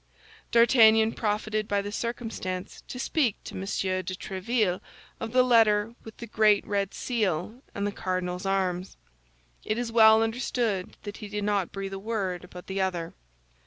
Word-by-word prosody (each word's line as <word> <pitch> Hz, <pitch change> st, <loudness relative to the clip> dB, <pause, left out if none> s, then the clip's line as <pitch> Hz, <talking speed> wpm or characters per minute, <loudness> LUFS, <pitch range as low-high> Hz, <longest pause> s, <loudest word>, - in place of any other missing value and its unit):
D'Artagnan 225 Hz, -2 st, +6 dB
profited 215 Hz, 0 st, -1 dB
by 200 Hz, -1 st, 0 dB
the 205 Hz, -, -5 dB
circumstance 220 Hz, -5 st, -4 dB
to -, -, -7 dB
speak 255 Hz, -3 st, +1 dB
to -, -, -9 dB
M. -, -, -5 dB
de 195 Hz, -, -5 dB, 0.5 s
Tréville 195 Hz, 0 st, -1 dB, 0.4 s
of 225 Hz, -, -4 dB
the 255 Hz, +1 st, +5 dB
letter 225 Hz, -3 st, +4 dB
with 220 Hz, -, -11 dB
the 235 Hz, -, -7 dB
great 215 Hz, -2 st, +3 dB
red 200 Hz, -1 st, -1 dB
seal 215 Hz, -1 st, -2 dB
and 200 Hz, -, -1 dB
the 205 Hz, -, -1 dB
cardinal's 185 Hz, -2 st, -3 dB
arms. 185 Hz, -1 st, -1 dB, 0.7 s
It 215 Hz, -, -1 dB
is 240 Hz, -1 st, -2 dB
well 220 Hz, -1 st, +7 dB
understood 225 Hz, -4 st, -2 dB
that 205 Hz, 0 st, -7 dB
he 210 Hz, -, -8 dB
did 210 Hz, 0 st, -4 dB
not 200 Hz, -3 st, 0 dB
breathe 195 Hz, 0 st, -5 dB
a 195 Hz, -, -4 dB
word 195 Hz, -4 st, -3 dB
about 180 Hz, 0 st, -11 dB
the 195 Hz, 0 st, -2 dB
other. 175 Hz, -3 st, -2 dB
210 Hz, 160 wpm, -27 LUFS, 190-225 Hz, 0.7 s, well